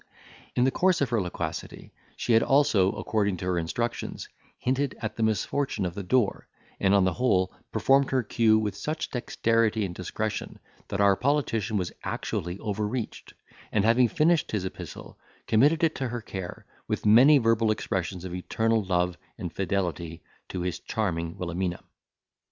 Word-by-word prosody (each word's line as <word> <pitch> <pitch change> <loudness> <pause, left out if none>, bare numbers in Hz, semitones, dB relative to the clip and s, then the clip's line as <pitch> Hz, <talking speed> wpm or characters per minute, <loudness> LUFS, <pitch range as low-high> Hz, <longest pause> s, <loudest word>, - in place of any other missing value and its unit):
In 125 - +3
the 130 - +3
course 185 +3 +2
of 135 -4 0
her 115 -3 +2
loquacity 85 -3 -5 0.2
she 120 - 0
had 115 - +6
also, 125 -8 +4
according 105 -2 0
to 90 - -6
her 90 -1 +1
instructions, 115 +9 -3 0.3
hinted 135 +2 -1
at 110 -1 -4
the - - -4
misfortune 110 +1 0
of 90 - -3
the 100 - -5
door; 105 +2 +1 0.3
and, 95 0 +4
on 100 - +5
the 95 - +1
whole, 95 -7 +1 0.2
performed 135 0 +3
her 130 -2 +1
cue 110 0 +3
with 105 -3 -1
such 155 +10 -4
dexterity 115 -3 +1
and 90 - -5
discretion 105 +4 -4 0.3
that 100 - -3
our 100 -1 +5
politician 115 -5 0
was 90 -3 -2
actually 90 +2 -3
overreached, 105 +3 -4 0.4
and, 105 -1 +2
having 120 +2 +5
finished 160 +6 +2
his 100 -3 -1
epistle, 95 - -8 0.3
committed 145 +9 +3
it 160 -1 +3
to 130 - -3
her 120 0 -4
care, 95 -4 -7 0.2
with - - -2
many 125 +8 +7
verbal 115 -3 +2
expressions 95 -4 -2
of 90 - -6
eternal 110 +4 0
love 90 -1 0 0.2
and 90 -6 -5
fidelity 85 -4 -2 0.3
to 90 - -4
his 90 -1 -2
charming 85 -6 -2
Wilhelmina. 90 0 -3
105 Hz, 165 wpm, -27 LUFS, 95-120 Hz, 0.4 s, many